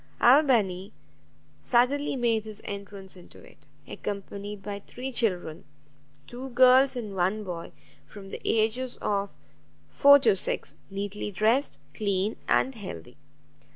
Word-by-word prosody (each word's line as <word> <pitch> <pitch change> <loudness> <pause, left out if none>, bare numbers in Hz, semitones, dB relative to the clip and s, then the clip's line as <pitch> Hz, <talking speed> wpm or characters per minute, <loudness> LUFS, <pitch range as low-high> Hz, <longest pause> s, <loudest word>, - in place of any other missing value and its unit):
Albany 225 -8 +3 0.7
suddenly 265 +4 +1
made 230 -4 +1
his 215 -1 -8
entrance 200 -1 -8
into 180 - -16
it, - - -18 0.2
accompanied 200 0 -6
by 200 0 -5
three 250 +6 -7
children, 180 -9 0 0.6
two 255 +2 -8
girls 255 +2 +5
and 220 -5 -5
one 190 +4 0
boy, 175 -4 -7 0.4
from 195 -2 -12
the - - -7
ages 230 +3 0
of 200 -1 -1 0.6
four 285 0 +7
to 270 -7 +3
six, 185 - -3
neatly 200 +1 -4
dressed, 220 +8 +1
clean, 200 0 -1
and 265 - +2
healthy. 185 - -9
210 Hz, 120 wpm, -27 LUFS, 195-250 Hz, 0.7 s, four